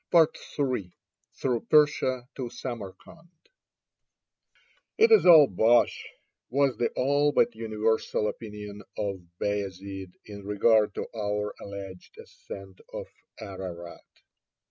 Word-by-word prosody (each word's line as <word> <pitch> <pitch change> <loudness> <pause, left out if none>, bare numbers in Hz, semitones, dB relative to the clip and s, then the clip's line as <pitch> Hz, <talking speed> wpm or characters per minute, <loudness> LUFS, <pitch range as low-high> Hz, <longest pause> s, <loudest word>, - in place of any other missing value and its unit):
III 140 - +1 0.4
THROUGH 125 -3 0
PERSIA 130 -5 +3
TO 125 -3 -5
SAMARKAND 120 - -8 1.7
"It 450 +1 +5
is 440 - +6
all 160 -4 +10
bosh," 115 +2 +2 0.4
was 135 0 +2
the 120 - +1
all 145 +3 +2
but 130 - +3
universal 110 -1 -1
opinion 105 -2 -7 0.2
of 100 -2 -2 0.2
Bayazid 95 -2 -4
in 100 -1 -9
regard 105 +1 +3
to - - -3
our 105 -1 -2
alleged 100 -2 -9
ascent 95 -1 -11
of - - -5 0.3
Ararat. 95 -4 -8
105 Hz, 100 wpm, -27 LUFS, 100-130 Hz, 1.7 s, all